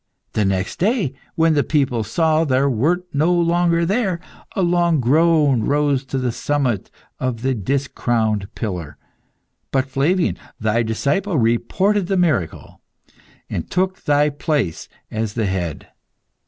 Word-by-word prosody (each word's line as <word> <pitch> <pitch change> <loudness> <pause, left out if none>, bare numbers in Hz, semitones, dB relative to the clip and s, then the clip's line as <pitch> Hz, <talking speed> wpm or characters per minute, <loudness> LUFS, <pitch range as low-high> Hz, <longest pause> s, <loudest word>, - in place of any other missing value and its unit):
The 105 - +1
next 95 0 -1
day, 200 - +1 0.2
when 165 0 +3
the 145 -2 +2
people 135 -7 +1
saw 160 +8 +2
thou 135 -2 +2
wert 155 +9 +1
no 155 +5 +2
longer 170 -1 +2
there, 195 -2 0 0.4
a 195 - +1
long 170 -2 +2
groan 145 0 +3
rose 145 -2 +1
to 135 - -3
the 125 -2 0
summit 130 -4 -1 0.3
of 125 -3 -2
the 135 0 +1
discrowned 115 -3 -1
pillar. 90 - -5 0.7
But 135 -1 +1
Flavian, 150 +7 0 0.2
thy 110 +1 +1
disciple, 140 - 0
reported 180 - +1
the 195 - 0
miracle, 145 - -1 0.7
and - - -4
took 185 +1 -1
thy 145 0 +3
place 145 - -2 0.2
as 110 -1 -3
the 115 -3 0
head. 90 -5 -3
140 Hz, 135 wpm, -20 LUFS, 115-170 Hz, 0.7 s, when